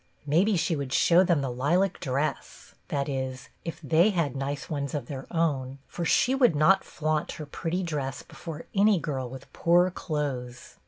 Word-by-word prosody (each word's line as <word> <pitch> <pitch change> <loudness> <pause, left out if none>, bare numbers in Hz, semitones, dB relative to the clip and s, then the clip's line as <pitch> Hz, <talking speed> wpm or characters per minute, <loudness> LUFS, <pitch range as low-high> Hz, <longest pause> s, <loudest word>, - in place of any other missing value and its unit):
Maybe 180 +8 +3
she 165 0 +1
would 140 -3 -4
show 175 +2 +5
them 170 -5 +2
the 135 -2 -2
lilac 170 +10 +1
dress, 140 +3 -3
— - - -41
that 140 -1 -1
is, 130 -2 -4
if 165 - -5
they 160 +6 +4
had 170 -9 0
nice 140 +1 -3
ones 140 -2 -3
of 140 -5 -3
their 135 0 -7
own, 140 -6 -1
for 170 - -4
she 250 +9 +3
would 250 - +4
not 155 +6 +4
flaunt 155 +1 -2
her 155 - -7
pretty 170 +5 -3
dress 145 -5 -3
before 165 -2 -8
any 205 0 +4
girl 135 -6 -3
with 130 +1 -11
poor 175 +2 +3
clothes. 135 -8 -4
150 Hz, 180 wpm, -27 LUFS, 135-175 Hz, -, show